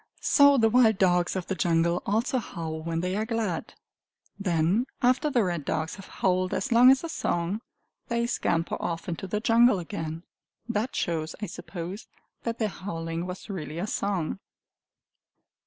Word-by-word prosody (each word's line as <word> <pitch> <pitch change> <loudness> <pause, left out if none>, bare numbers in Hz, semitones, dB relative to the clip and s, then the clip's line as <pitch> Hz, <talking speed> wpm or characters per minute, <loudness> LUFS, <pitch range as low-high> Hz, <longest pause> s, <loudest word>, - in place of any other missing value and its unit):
So 285 -1 +6
the 225 -3 +5
wild 225 -2 +4
dogs 180 -2 +2
of 185 -2 -2
the - - -2
jungle 170 0 +1
also 230 +5 +1
howl 160 -7 -5
when 165 0 -2
they 180 +1 -1
are 215 - 0
glad. 220 -7 -2 0.6
Then, 185 +5 +1 0.2
after 260 +5 +3
the 245 -6 +2
red 175 -5 -2
dogs 160 +3 -2
have 195 - -11
howled 185 -1 0
as 270 - -2
long 240 +2 +8
as 265 +2 +5
a - - -2
song, 180 - -1 0.5
they 235 0 0
scamper 165 -8 0
off 165 -1 -3
into 175 +2 -4
the 210 +3 -1
jungle 230 0 +5
again. 165 -2 -5 0.4
That 235 +2 -2
shows, 160 -2 -2
I 210 - -3
suppose, 180 +2 -7 0.3
that 230 0 -3
their 220 - +1
howling 165 -3 -4
was 180 0 -7
really 160 -7 -5
a 175 - -1
song! 195 -5 -2
190 Hz, 165 wpm, -27 LUFS, 170-230 Hz, 0.6 s, long